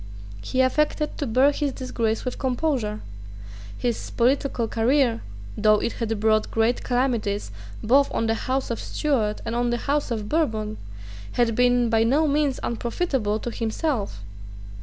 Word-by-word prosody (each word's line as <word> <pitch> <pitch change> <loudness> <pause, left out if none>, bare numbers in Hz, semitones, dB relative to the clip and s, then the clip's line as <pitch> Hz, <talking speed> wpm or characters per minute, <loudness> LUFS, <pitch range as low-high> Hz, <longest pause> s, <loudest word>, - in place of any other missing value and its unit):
He 255 - 0
affected 300 +3 +1
to 285 - -1
bear 255 +5 +4
his 285 -1 -2
disgrace 230 -3 -2
with 250 - -4
composure. 250 -5 -1 0.8
His 240 -2 -2
political 250 -1 +1
career, 235 +1 +2 0.3
though 215 0 +4
it 230 - -1
had 225 -2 -2
brought 215 0 +2
great 225 +2 +1
calamities 240 - 0 0.3
both 275 +5 +4
on 225 - 0
the 225 - +2 0.2
House 265 -1 0
of 230 - -3
Stuart 230 -8 -1
and 230 - -3
on 240 0 +1
the 240 - 0
House 285 0 0
of 220 -3 -3
Bourbon, 220 -9 -1 0.6
had 240 -2 +2
been 245 0 +3
by 225 0 +4
no 285 +7 +3
means 290 -2 +1
unprofitable 235 -2 -1
to 240 - -4
himself. 225 - -2
240 Hz, 150 wpm, -24 LUFS, 225-270 Hz, 0.8 s, bear